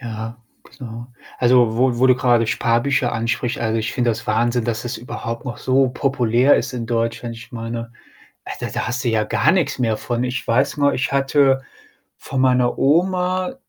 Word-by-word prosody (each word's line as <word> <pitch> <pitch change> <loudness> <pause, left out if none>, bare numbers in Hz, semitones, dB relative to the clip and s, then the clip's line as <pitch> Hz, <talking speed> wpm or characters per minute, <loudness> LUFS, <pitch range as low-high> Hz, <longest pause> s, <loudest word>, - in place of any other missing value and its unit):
Ja, 115 -1 -7 0.4
genau. 120 -2 -8 0.3
Also, 120 -2 +3
wo 125 -1 +2
wo 130 - +4
du 130 - +6
grade 120 -3 +2
Sparbücher 120 +3 +1
anspricht. 120 +2 -2
Also, 115 -1 -1
ich 110 - -3
finde 120 -2 +1
das 115 0 -5
Wahnsinn, 120 +2 +1
dass 115 0 -3
es 120 0 -4
überhaupt 115 -1 -6
noch 125 - -5
so 130 0 +2
populär 125 -1 +2
ist - - -2
in 115 -2 -4
Deutschland. 115 0 -2
Ich 115 - -12
meine, 115 0 -5 0.5
äh, - - -6
da - - -3
da - - -3
hast 125 +2 -3
du 120 - +1
ja 110 -1 +1
gar 155 - +2
nix 175 -6 0
mehr 115 -3 +1
von. 120 0 -2
Ich 125 +1 -3
weiß 115 +5 +1
mal, 145 0 +2
ich 130 - -1
hatte 135 -1 +3 0.6
von 135 - -5
meiner 125 -1 +2
Oma 185 - +1
120 Hz, 190 wpm, -20 LUFS, 115-130 Hz, 0.6 s, du